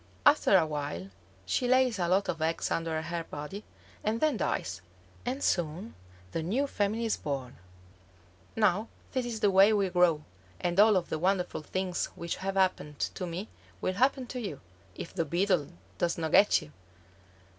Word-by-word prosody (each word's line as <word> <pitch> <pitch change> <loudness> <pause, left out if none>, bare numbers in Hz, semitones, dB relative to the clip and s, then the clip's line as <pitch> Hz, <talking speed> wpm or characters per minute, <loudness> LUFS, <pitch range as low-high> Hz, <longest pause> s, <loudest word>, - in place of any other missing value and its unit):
After 290 -9 +6
a 170 - +3
while 140 - -4 0.3
she 245 - 0
lays 255 -4 +3
a 175 - +1
lot 190 +3 +2
of 165 - -3
eggs 165 +1 0
under 165 -1 -1
her 170 0 -3
body, 155 +8 -7 0.4
and 220 +2 0
then 310 +2 +2
dies. - - -2 0.5
And 265 +3 -2
soon 175 +5 -1 0.4
the 165 - -2
new 220 - 0
family 220 -3 -1
is 225 - 0
born. 135 -4 -4 1.0
Now 210 0 +2 0.2
this 255 -2 -1
is 225 -2 -4
the 205 - +4
way 195 +3 +7
we 200 -2 +2
grow, 175 -4 +3 0.4
and 175 +2 0
all 210 -1 +7
of 175 - -2
the 155 - -2
wonderful 180 -1 0
things 185 +3 -2
which 170 0 -4
have 195 +1 -3
happened 185 -6 +1 0.2
to 180 - -4
me 175 +5 -5 0.3
will 185 - -1
happen 260 +5 +2
to 250 +1 -6
you, 195 - -5 0.4
if 170 - -7
the - - 0
Beetle 175 0 +1 0.3
does 170 -1 +1
not 160 -2 -2
get 205 -5 +5
you." 150 - -14
185 Hz, 175 wpm, -30 LUFS, 165-215 Hz, 1.0 s, way